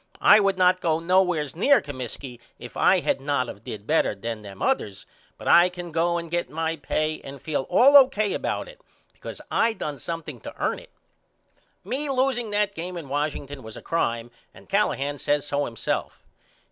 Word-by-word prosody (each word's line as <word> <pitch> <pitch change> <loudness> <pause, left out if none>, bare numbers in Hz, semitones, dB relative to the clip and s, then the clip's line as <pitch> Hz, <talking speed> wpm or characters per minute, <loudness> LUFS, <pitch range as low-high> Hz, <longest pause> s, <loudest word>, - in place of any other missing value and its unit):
I 215 - +7
would 195 -2 +1
not 185 0 +4
go 160 -2 +1
nowheres 170 -4 +1
near 270 - +5
Comiskey 130 - -7 0.2
if - - -11
I - - +4
had - - 0
not 140 -3 0
of 100 -2 -9
did 105 -2 -7
better 155 -7 +2
than 115 +2 -5
them 100 -2 -11
others 100 -2 -1 0.3
but - - -9
I 175 +1 +7
can 175 -1 -8
go 170 +2 +1
and 170 -1 -6
get 175 -5 -1
my 160 +2 -2
pay 155 +1 -2
and 135 0 -9
feel 145 -3 -3
all 275 +3 +6
O.K. 215 -7 +6
about - - -2
it - - -14 0.3
because - - -9
I 230 0 +2
done 150 -9 -5
something 165 -1 -6
to - - -9
ern - - 0
it. - - -16 0.9
Me 285 +4 -3
loseing 255 -3 0
that 205 -1 0
game 180 0 -5
in 155 -5 -8
Washington 145 -1 -3
was 110 0 -10
a - - -9
crime 120 -7 -1 0.2
and - - -16
Callahan 145 -8 0
says 145 -1 0
so 145 0 -1
himself. 115 -2 -4
160 Hz, 185 wpm, -25 LUFS, 140-190 Hz, 0.9 s, I